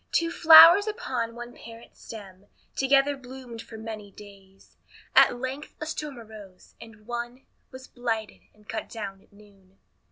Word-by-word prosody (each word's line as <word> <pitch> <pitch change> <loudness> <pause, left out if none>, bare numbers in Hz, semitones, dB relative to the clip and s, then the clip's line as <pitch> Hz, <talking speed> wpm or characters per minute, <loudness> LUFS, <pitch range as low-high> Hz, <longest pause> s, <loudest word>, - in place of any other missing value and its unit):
Two 335 0 0
flowers 335 +5 +8
upon 255 - -4
one 240 0 -9
parent 230 0 -14
stem 200 -3 -12 0.3
Together 275 +1 +2
bloomed 255 -3 -11
for 225 - -12
many 220 -2 -8
days. 195 -1 -17 0.4
At - - +5
length 260 +3 -6
a 310 - -5
storm 300 -3 -6
arose, 210 -5 -14
and 220 -2 -15
one 240 +2 -6 0.2
Was 260 0 -12
blighted, 225 -3 -4
and 210 0 -26
cut 225 - -6
down 200 -4 -8
at - - -28
noon. 200 -2 -22
230 Hz, 150 wpm, -26 LUFS, 210-265 Hz, 0.4 s, flowers